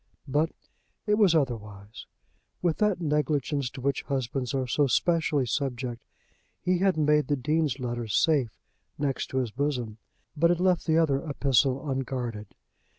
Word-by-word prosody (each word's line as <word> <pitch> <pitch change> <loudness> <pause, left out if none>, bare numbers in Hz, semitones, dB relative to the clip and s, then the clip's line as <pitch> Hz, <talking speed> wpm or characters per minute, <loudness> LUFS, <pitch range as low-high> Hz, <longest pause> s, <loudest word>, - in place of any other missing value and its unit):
But 150 +4 +1 0.5
it 210 - +2
was 190 -6 +5
otherwise. 105 -7 -3 0.6
With 170 -3 +1
that 210 -4 +2
negligence 150 -3 0
to 130 - -10
which 140 0 0
husbands 130 -2 -2
are 135 -1 -1
so 140 +4 +2
specially 155 -2 +2
subject, 125 -2 -3 0.6
he 180 -1 +1
had 190 -2 +2
made 150 -2 +3
the 145 - +1
Dean's 150 +1 0
letter 120 -3 -4
safe 135 +2 +2 0.5
next 140 -2 -1
to 130 - -4
his 125 -4 0
bosom, 125 -4 -2 0.4
but 165 +3 +3
had 175 0 +2
left 180 -1 +2
the 160 0 +3
other 145 -4 +2
epistle 135 0 +1
unguarded. 125 -6 -4
140 Hz, 150 wpm, -27 LUFS, 125-155 Hz, 0.6 s, was